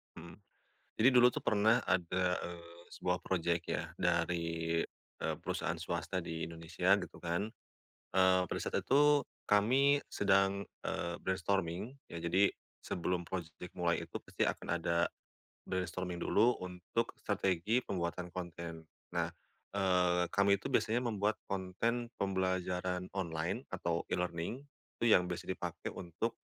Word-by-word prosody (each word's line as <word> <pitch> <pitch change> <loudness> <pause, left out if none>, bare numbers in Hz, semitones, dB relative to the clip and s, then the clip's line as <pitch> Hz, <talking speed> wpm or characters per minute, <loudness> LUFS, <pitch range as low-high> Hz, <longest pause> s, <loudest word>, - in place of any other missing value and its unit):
Mhm, 85 0 -10 0.6
jadi 115 - +6
dulu 125 0 +8
tuh - - -3
pernah 110 +2 +4
ada, 90 0 +1
eee, 85 0 -9
sebuah 90 0 0
project 85 -2 0
ya - - -1
dari, 85 -1 +1 0.4
eee, - - 0
perusahaan - - -1
swasta 95 - -2
di 80 0 -3
Indonesia 85 +4 +2
gitu - - -6
kan. 85 +5 -1 0.6
Eee, 95 -1 +5
pada - - -3
saat - - -1
itu 145 +1 +5 0.2
kami 130 +8 +5
sedang, 95 0 +3 0.2
eee, 85 0 -2
brainstorming 95 +5 -1 0.2
ya 85 - -5
jadi 95 +4 +3 0.3
sebelum 90 0 -1
project 85 -1 -6
mulai 85 -2 +1
itu - - -36
pasti - - -1
akan - - -1
ada 85 0 +1 0.6
brainstorming 90 -1 -2
dulu 120 +4 +4
untuk 90 +6 -2
strategi 95 +6 +1
pembuatan 90 -2 -3
konten. 85 -2 -6 0.3
Nah, - - +1 0.5
eee, 90 -3 +3
kami 100 0 +4
itu - - -4
biasanya 120 0 +2
membuat 105 -2 +1
konten 100 +6 -1
pembelajaran 95 -1 -1
online 85 +5 -2
atau 85 0 -1
e-learning 90 +6 -1 0.4
itu - - +1
yang 90 - +7
biasa 90 -1 -4
dipakai 90 -2 -4
untuk, 90 +6 -3
90 Hz, 130 wpm, -34 LUFS, 85-100 Hz, 0.6 s, dulu